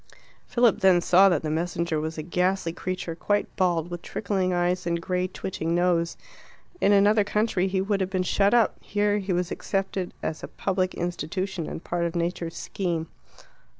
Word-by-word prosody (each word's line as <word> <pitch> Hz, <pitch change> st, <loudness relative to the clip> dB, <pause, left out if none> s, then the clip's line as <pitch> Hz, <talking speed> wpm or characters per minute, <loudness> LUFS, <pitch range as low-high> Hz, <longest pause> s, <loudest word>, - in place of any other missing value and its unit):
Philip 235 Hz, -3 st, +3 dB
then 190 Hz, -3 st, +5 dB
saw 185 Hz, +3 st, +6 dB
that 170 Hz, -5 st, +1 dB
the 155 Hz, -, -2 dB
messenger 170 Hz, 0 st, -1 dB
was 160 Hz, +1 st, -4 dB
a 155 Hz, -, -3 dB
ghastly 180 Hz, 0 st, 0 dB
creature, 180 Hz, -1 st, -4 dB
quite 205 Hz, +5 st, -1 dB
bald, 175 Hz, -2 st, +1 dB
with 175 Hz, -1 st, -5 dB
trickling 190 Hz, -2 st, -1 dB
eyes 180 Hz, 0 st, 0 dB
and 170 Hz, 0 st, 0 dB
grey 180 Hz, +1 st, -1 dB
twitching 175 Hz, -3 st, -3 dB
nose. 175 Hz, -1 st, +1 dB, 0.6 s
In 200 Hz, -, +4 dB
another 205 Hz, +1 st, +5 dB
country 205 Hz, -2 st, +1 dB
he 190 Hz, 0 st, 0 dB
would 195 Hz, 0 st, 0 dB
have 190 Hz, -, 0 dB
been 185 Hz, -1 st, 0 dB
shut 200 Hz, +2 st, +2 dB
up; 235 Hz, -2 st, +3 dB
here 205 Hz, 0 st, +1 dB
he 195 Hz, -1 st, -3 dB
was 175 Hz, -1 st, 0 dB
accepted 195 Hz, -2 st, -2 dB
as 160 Hz, -, -3 dB
a -, -, -6 dB
public 185 Hz, -1 st, -1 dB
institution, 175 Hz, 0 st, -3 dB
and -, -, -6 dB
part 170 Hz, 0 st, -1 dB
of 170 Hz, 0 st, -3 dB
Nature's 170 Hz, -1 st, -2 dB
scheme. 170 Hz, -4 st, -3 dB
180 Hz, 180 wpm, -26 LUFS, 170-195 Hz, 0.6 s, saw